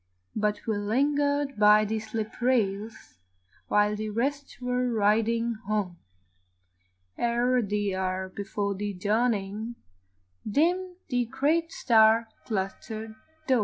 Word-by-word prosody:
But 210 -1 0
we 220 -2 0
lingered 285 +4 +1
by 210 0 +6
the 220 +1 -1
slip 220 +1 -5
rails 220 - -1 0.5
While 210 0 +3
the 215 +1 -4
rest 275 +6 -2
were 250 0 0
riding 225 +2 +2
home, 205 -5 -1 1.2
Ere 240 +1 +2
the 205 -2 -1
hour 190 0 -2
before 200 +1 -3
the 205 +1 -4
dawning, 215 +2 -1 0.7
Dimmed 355 - +1
the 245 -3 +1
great 295 +7 0
star 225 -1 +4 0.2
clustered 220 +2 -4 0.3
dome. 260 -4 +3
220 Hz, 110 wpm, -27 LUFS, 205-250 Hz, 1.2 s, by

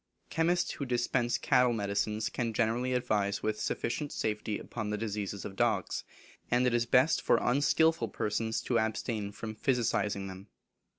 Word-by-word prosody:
Chemists 170 +3 +1
who 140 - -4
dispense 120 -1 +1
cattle 125 -1 +3
medicines 105 0 -1
can 115 -2 -2
generally 120 +3 +1
advise 105 -5 0
with 110 0 -1
sufficient 145 +4 -2
safety 105 -1 -2
upon 110 -3 -5
the 105 - -1
diseases 105 -2 -4
of 95 - -6
dugs, - - 0 0.5
and 125 +1 +3
it 125 - +2
is 120 0 +1
best 130 +6 +4
for - - +4
unskilful 145 +1 +3
persons 110 +2 -2
to 120 -2 +1
abstain 110 -1 -2
from 110 +1 -6
physicing 110 -5 0
them. 95 +2 -9
115 Hz, 155 wpm, -31 LUFS, 105-125 Hz, 0.5 s, best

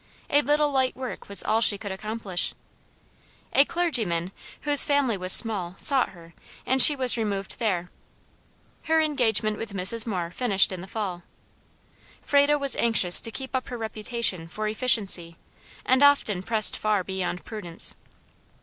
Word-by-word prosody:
A 290 - +2
little 295 0 -1
light 260 -2 -1
work 255 -5 -9
was 200 - +4
all 220 +1 -1
she 210 -2 +4
could 200 0 -9
accomplish. 200 -2 -6 1.0
A 275 - +4
clergyman, 220 - -2 0.3
whose 290 -1 +7
family 285 -6 0
was 185 -1 +3
small, 190 -7 +5
sought 270 -4 +4
her, 170 -2 -18 0.3
and 260 +1 +1
she 295 - +8
was 255 -3 +1
removed 200 -3 -5
there. 180 -6 -4 0.9
Her 320 0 0
engagement 230 -8 -1
with 220 -3 -9
Mrs. 205 +5 0
Moore 180 -5 -5
finished 200 -4 +1
in 185 -2 -8
the 190 - -12
fall. 195 -5 -7 1.0
Frado 285 +1 +1
was 280 -2 -1
anxious 215 -6 +6
to - - -5
keep 265 +3 -8
up 255 - -4
her 245 - -8
reputation 220 -5 -4
for 215 +5 -6
efficiency, 205 -7 -2 0.5
and 260 +1 +1
often 280 -10 +1
pressed 215 +2 0
far 210 -3 -2
beyond 180 -1 -6
prudence. 175 -7 -3
220 Hz, 150 wpm, -23 LUFS, 190-260 Hz, 1.0 s, she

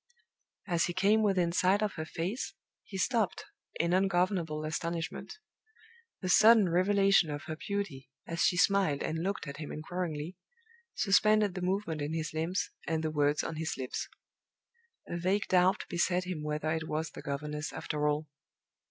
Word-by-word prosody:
As 170 -4 +1
he 175 - -3
came 205 +3 +4
within 185 -5 +2
sight 190 +4 +3
of 210 - -1
her 155 - -5
face, 185 - -3 0.3
he 195 - -7
stopped 220 0 0 0.3
in 170 +1 +2
ungovernable 180 -4 +1
astonishment. 165 - -4 0.8
The 185 - -3
sudden 215 0 +7
revelation 195 0 +4
of 145 -1 -4
her 155 - -5
beauty, 160 -8 -4 0.2
as 165 0 -3
she 175 - +3
smiled 195 -6 +3
and 160 - -2
looked 195 +3 -2
at 140 - -6
him 150 -1 -6
inquiringly, 165 0 -4 0.6
suspended 215 0 +4
the 180 - -5
movement 180 -4 -1
in 145 +2 -2
his 155 -1 -3
limbs 165 +4 -1 0.2
and 160 0 0
the 155 - -1
words 145 -1 +2
on 160 - -4
his 160 0 -2
lips. 130 -1 -4 1.0
A 170 - -4
vague 190 +4 +1
doubt 185 +2 +3
beset 180 +1 +1
him 180 -4 -4
whether 150 +1 -2
it 160 0 -2
was 155 +1 -2
the - - -9
governess, 150 +2 -4
after 150 0 -2
all. 150 +1 0
175 Hz, 160 wpm, -31 LUFS, 155-195 Hz, 1.0 s, sudden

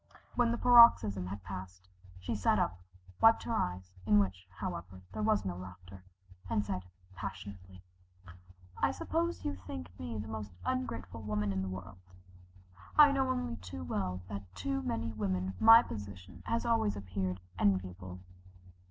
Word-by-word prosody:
When 240 -1 +2
the 235 - 0
paroxysm 235 - +7
had 100 +1 -6
passed, 90 -1 -8 0.3
she 90 - -3
sat - - +2
up, 90 - 0 0.4
wiped 225 0 +6
her 230 - -3
eyes 90 - -2
in 105 +1 +4
which, 95 -2 0
however, 90 0 -6
there 110 - -4
was 100 -1 +2
no 90 -2 -2
laughter, 90 +1 -11 0.5
and 105 - +1
said 90 -2 -3 0.3
passionately: 95 -1 -8 1.0
"I - - +3
suppose 335 +1 -2
you 95 - 0
think 90 -2 -8
me 85 +6 -5
the 105 +1 -5
most 110 -3 -6
ungrateful 255 - -3
woman 105 -1 -1
in 95 - -1
the 95 - -3
world. 95 0 -8 1.0
I 295 -1 +9
know 265 -1 +1
only 250 - -2
too 90 -2 -8
well 90 +1 -2
that 100 -2 -7
to 90 0 -2
many 115 +4 -2
women 95 -3 -1
my 225 +1 +9
position 100 -5 -8
has 230 +1 0
always 225 - +2
appeared 95 -2 -3 0.2
enviable. 95 -2 0
95 Hz, 150 wpm, -33 LUFS, 90-110 Hz, 1.0 s, I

